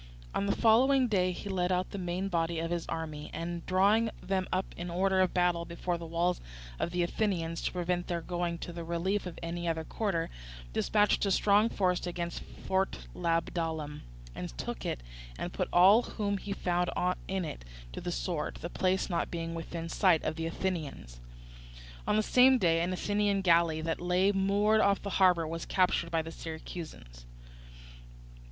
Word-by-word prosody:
On 200 - 0
the - - +1
following 255 +4 +5
day 185 -4 +2
he 180 - -7
led 185 -2 0
out 180 0 0
the 200 - -5
main 180 +2 -2
body 170 -2 0
of 165 +1 -2
his 170 -1 -2
army, 155 -2 -4
and, 170 0 -4
drawing 205 +5 +4
them 190 -1 -1
up 185 +1 +1
in 175 0 -5
order 190 +2 +2
of 185 - +2
battle 175 -1 +2
before 170 +1 -3
the 165 - -7
walls 170 +2 0 0.4
of - - 0
the 175 0 0
Athenians 170 -3 -1
to - - -1
prevent 175 0 -1
their 175 -2 -1
going 175 0 -2
to 175 - -7
the 170 0 -5
relief 180 +4 -1
of 175 - -8
any 170 +1 -3
other 160 -1 -1
quarter, 170 -2 -2 0.4
dispatched 210 - +2
a - - +2
strong 205 +3 +4
force 180 -4 0
against 170 -1 -4 0.2
Fort 190 0 0
Labdalum, 165 -3 -1 0.3
and - - -7
took - - -4
it, - - -3 0.4
and - - -4
put - - -2
all 195 +6 +7
whom 205 -4 -2
he 200 - -6
found 180 -2 0 0.4
in 190 -2 -1
it - - -7 0.3
to - - -6
the - - -3
sword, - - -2
the - - -5
place 185 0 +1
not 175 -3 -1
being 165 -1 -4
within 165 0 -5
sight 170 -1 +3
of 155 - -1
the 165 0 -3
Athenians. 155 - -4 0.9
On - - +3
the 215 - +3
same 255 +3 +6
day 165 -6 +3
an 175 +2 0
Athenian 205 +1 +1
galley 170 -3 +3
that 165 +1 -2
lay 180 +3 +3
moored 205 +2 +3
off 200 -1 +3
the 200 - -4
harbour 175 -3 +5
was 165 +1 -4
captured 180 -2 +2
by 165 -1 0
the 165 - -7
Syracusans. 155 - -8
175 Hz, 180 wpm, -31 LUFS, 165-195 Hz, 0.9 s, all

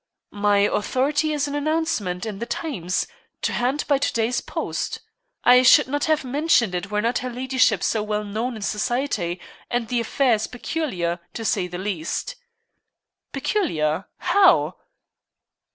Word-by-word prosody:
"My 205 0 +3
authority 270 +9 +1
is 295 -1 0
an 285 - -5
announcement 290 - -1
in 210 -3 -5
the 235 - -4
Times 195 - -2 0.4
to - - 0
hand 260 +5 0
by 280 -2 +3
to - - +1
day's 235 +2 0
post. - - -4 0.4
I 250 +1 +7
should 255 - +6
not 290 +2 -1
have 310 -2 +1
mentioned 255 - +2
it 180 +2 -3
were 210 0 -1
not 235 +1 +1
her 255 - -4
ladyship 255 +1 +1
so 220 - +1
well 210 0 -2
known 220 +4 -3
in 215 - -7
society, 210 -5 -1 0.3
and 240 -2 -1
the 245 - +1
affair 245 +2 +2
is 215 0 0
peculiar, 195 - -3 0.2
to 225 - -4
say 190 -4 +1
the 175 0 -6
least." 190 - -3 1.0
"Peculiar 165 - 0
how?" 380 +2 +4
235 Hz, 150 wpm, -23 LUFS, 205-280 Hz, 1.0 s, I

